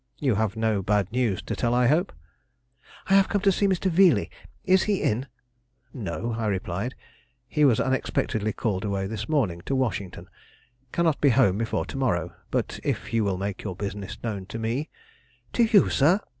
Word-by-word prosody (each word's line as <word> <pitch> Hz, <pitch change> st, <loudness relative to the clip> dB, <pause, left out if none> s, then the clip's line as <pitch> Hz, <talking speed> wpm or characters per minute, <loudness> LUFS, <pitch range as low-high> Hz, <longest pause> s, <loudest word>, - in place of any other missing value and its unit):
You 135 Hz, -5 st, +1 dB
have 105 Hz, 0 st, 0 dB
no 110 Hz, -2 st, 0 dB
bad 100 Hz, 0 st, 0 dB
news 115 Hz, -6 st, 0 dB
to -, -, -4 dB
tell, 120 Hz, 0 st, 0 dB
I 125 Hz, 0 st, +3 dB
hope." 160 Hz, +9 st, +2 dB, 0.9 s
"I 195 Hz, -, +1 dB
have 195 Hz, -1 st, +5 dB
come 205 Hz, -, 0 dB
to 200 Hz, -1 st, +4 dB
see 200 Hz, +2 st, +1 dB
Mr. 190 Hz, 0 st, 0 dB
Veeley; 180 Hz, 0 st, +4 dB, 0.3 s
is 190 Hz, 0 st, +5 dB
he 205 Hz, -2 st, 0 dB
in?" 120 Hz, +6 st, 0 dB, 0.7 s
"No," 110 Hz, -, -4 dB
I 110 Hz, -, -1 dB
replied; 100 Hz, +4 st, -2 dB, 0.5 s
"he 150 Hz, -2 st, +2 dB
was 120 Hz, -6 st, +4 dB
unexpectedly 110 Hz, -5 st, 0 dB
called 100 Hz, -3 st, -2 dB
away 100 Hz, -2 st, -1 dB
this 105 Hz, +6 st, -5 dB
morning 110 Hz, -, 0 dB
to 135 Hz, -, 0 dB
Washington; 100 Hz, -8 st, -2 dB, 0.6 s
cannot 165 Hz, -4 st, +1 dB
be 145 Hz, -, +5 dB
home 115 Hz, -6 st, +3 dB
before 115 Hz, 0 st, -1 dB
to -, -, -7 dB
morrow; 90 Hz, -10 st, 0 dB, 0.2 s
but -, -, -2 dB
if -, -, -3 dB
you 115 Hz, -1 st, +2 dB
will 100 Hz, -2 st, 0 dB
make 100 Hz, +1 st, -4 dB
your 95 Hz, -4 st, -5 dB
business 100 Hz, 0 st, -5 dB
known 100 Hz, -5 st, -4 dB
to 105 Hz, -, -6 dB
me 115 Hz, +7 st, -2 dB, 0.3 s
" -, -, -36 dB
"To 235 Hz, -, +4 dB
you, 215 Hz, -3 st, +5 dB
sir?" 165 Hz, +8 st, +4 dB
115 Hz, 185 wpm, -25 LUFS, 100-145 Hz, 0.9 s, have